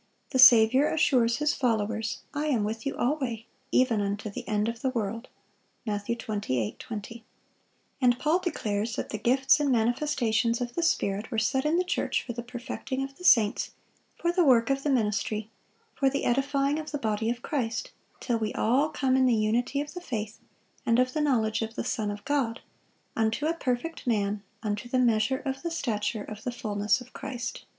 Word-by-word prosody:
The 260 - 0
Saviour 255 +2 +7
assures 245 -7 +3
His 300 0 +1
followers, 225 -3 -1
"I 295 +1 -1
am 245 -8 +1
with 220 +4 -3
you - - -3
alway, 245 -4 -1 0.3
even 245 -5 +3
unto 200 +1 -3
the 245 +4 -7
end 210 0 0
of 230 0 -4
the 265 - +1
world." 230 -1 -3 0.6
Matt. 205 -2 -2
28:20. 210 - -3 0.8
And 245 -1 +4
Paul 310 +6 +2
declares 220 - -2
that - - -4
the 215 - -4
gifts 265 +6 +4
and 290 -2 +1
manifestations 235 -1 +1
of 240 -1 -4
the 340 - -1
Spirit 205 -10 0
were 230 - -3
set 265 +5 +1
in 310 +3 +2
the 365 - +2
church 360 - -1
"for 240 - -5
the 235 - -5
perfecting 250 +2 -5
of 275 0 -7
the - - -11
saints, 225 -11 +4 0.4
for 345 - 0
the 355 0 +3
work 250 -4 +4
of 275 0 0
the 295 - -1
ministry, 215 -3 0 0.4
for 275 - +2
the 280 +1 -2
edifying 275 +3 +1
of 310 - -6
the 295 - -3
body 220 -3 -1
of 240 +1 -3
Christ: 230 -6 -2 0.3
till 235 -3 -1
we 215 -1 -2
all 270 +7 +2
come 265 -4 +1
in 260 -1 +4
the 240 - +4
unity 235 +6 +1
of 290 0 -7
the 360 - -7
faith, 220 -8 -5 0.4
and 230 0 +2
of 255 0 +2
the 310 - 0
knowledge 230 -8 +1
of 225 0 -4
the - - -2
Son 215 -3 -2
of 205 0 -6
God, 270 -5 0 0.5
unto 225 +6 0
a 320 - +2
perfect 305 0 -3
man, 205 -3 0 0.2
unto 210 +2 -3
the 255 - +1
measure 240 +1 +2
of 270 0 -3
the 340 - -2
stature 220 -9 -2
of 215 0 -9
the 250 - -2
fulness 210 0 0
of 250 0 -14
Christ." 255 -3 -5
240 Hz, 190 wpm, -28 LUFS, 220-275 Hz, 0.8 s, Saviour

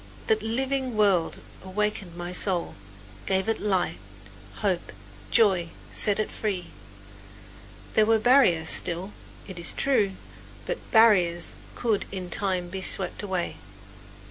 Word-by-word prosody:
That 445 -2 +2
living 260 +1 -1
word 195 -6 +3 0.3
awakened 190 -2 -2
my 175 0 -5
soul, 180 -2 -1 0.5
gave 190 +1 +1
it 225 - 0
light, 190 -4 0 0.6
hope, 190 -5 -1 0.4
joy, 185 - +3 0.2
set 205 -1 +2
it 215 - -1
free! 190 -5 -3 1.2
There 215 -1 +4
were 225 0 +5
barriers 220 -9 +4
still, 175 +4 -1 0.3
it 190 -3 -8
is 170 - -1
true, 225 -8 +2 0.5
but - - -3
barriers 185 -7 +4
that - - -16
could 225 -4 +1
in 185 -2 -6
time 185 -3 -1
be 190 +1 -5
swept 190 -1 +1
away. 190 -4 -3
195 Hz, 125 wpm, -26 LUFS, 180-220 Hz, 1.2 s, were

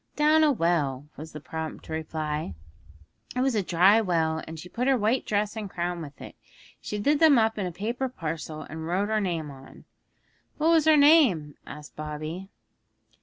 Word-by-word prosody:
'Down 305 +1 +4
a 305 - +5
well,' 150 - 0
was 160 +2 -9
the 150 - -8
prompt 160 +1 -6
reply. 155 - -4 0.8
'It 250 - 0
was 265 0 +2
a 215 - +1
dry 190 +5 +4
well, 160 -5 0
and 160 0 -8
she 180 - -9
put 245 +7 -2
her 270 -1 +4
white 225 +4 0
dress 210 +1 0
and 215 -3 -5
crown 175 -1 -3
with 145 -2 -10
it; - - -10 0.5
she 210 - -5
did 285 +8 +2
them 315 -5 +6
up 220 -1 +2
in 190 - -1
a - - -5
paper 235 +9 -3
parcel, 160 -6 -5
and 160 +2 -7
wrote 190 +4 0
her 215 -1 +1
name 165 -6 -2
on.' 135 -1 -14 0.7
'What 315 +2 +3
was 320 -2 +4
her 315 -1 +6
name?' 275 - +5
asked 150 0 -10
Bobby. 155 +5 -6
180 Hz, 185 wpm, -26 LUFS, 155-230 Hz, 0.8 s, them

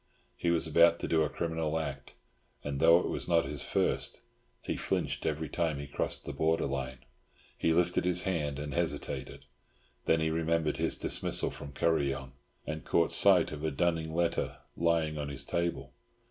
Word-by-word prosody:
He 85 - -1
was 85 -1 +2
about 85 +1 +5
to - - -2
do 80 -1 +2
a 75 - +1
criminal 80 -1 -2
act, 80 - -5 0.5
and 70 -1 -3
though 85 +2 +6
it - - -3
was - - -2
not 85 -3 +3
his 70 0 -4
first, - - -1 0.4
he - - -2
flinched - - -2
every 80 0 -2
time 80 0 -1
he 70 - -5
crossed 70 - -3
the - - -5
border 80 +1 +1
line. 65 -2 -4 0.5
He 80 - +1
lifted 90 +2 +2
his 90 0 +2
hand, 75 -7 -1
and 75 -1 -5
hesitated; - - -3 0.6
then 80 - +3
he 80 0 0
remembered 80 -1 0
his - - -1
dismissal - - +2
from 70 0 -9
Kuryong, 70 -3 0 0.3
and 80 -2 -5
caught 85 - +1
sight 95 -4 +6
of 75 0 -7
a 80 - +1
dunning 80 +1 0
letter 85 -1 0 0.2
lying 80 -2 +1
on 70 -1 -3
his 70 -1 -3
table. 85 +2 -2
80 Hz, 175 wpm, -30 LUFS, 75-85 Hz, 0.6 s, though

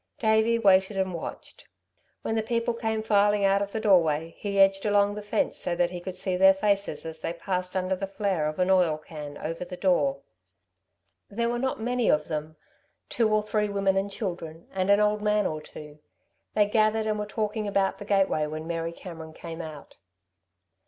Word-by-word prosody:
Davey 220 +1 +3
waited 195 -2 +3
and 190 -1 0
watched. 165 - -8 0.6
When - - -1
the 225 - +1
people 230 +1 -1
came 220 -1 -2
filing 205 -1 +3
out 195 0 +3
of 200 0 -3
the 220 - -2
doorway, 165 -6 +3
he 200 -1 -2
edged 195 0 +5
along 205 -1 +3
the 210 - -6
fence 205 - -1
so 175 - -2
that 175 0 +1
he 180 - -5
could 185 0 -6
see 185 0 -2
their 190 +1 +6
faces 200 -5 0
as 160 0 -7
they 165 - -2
passed 180 +2 -3
under 185 0 0
the 195 +1 -4
flare 195 -5 -1
of 155 - -4
an 185 +1 +2
oil 175 -5 +3
can 150 -2 -9
over 165 +2 -4
the 180 0 -8
door. 145 -8 +1 1.1
There 235 +3 -1
were 240 0 -1
not 260 -1 -1
many 245 +1 0
of 150 +1 +2
them, 155 0 -4 0.5
two 225 -2 +1
or 215 0 +2
three 210 0 0
women 195 -1 +1
and 195 +1 0
children, 170 -5 -6
and 190 0 -1
an 200 0 +6
old 210 0 +2
man 210 0 +2
or 155 -1 -2
two. 150 0 -12 0.6
They 210 -1 +5
gathered 215 +1 +2
and 215 -1 -1
were 210 - -3
talking 215 0 -2
about 195 -1 0
the 205 - -7
gateway 195 -6 +2
when 155 +1 -6
Mary 165 0 -3
Cameron 165 -3 -9
came 165 +1 -7
out. 155 -2 -10
195 Hz, 200 wpm, -27 LUFS, 170-210 Hz, 1.1 s, their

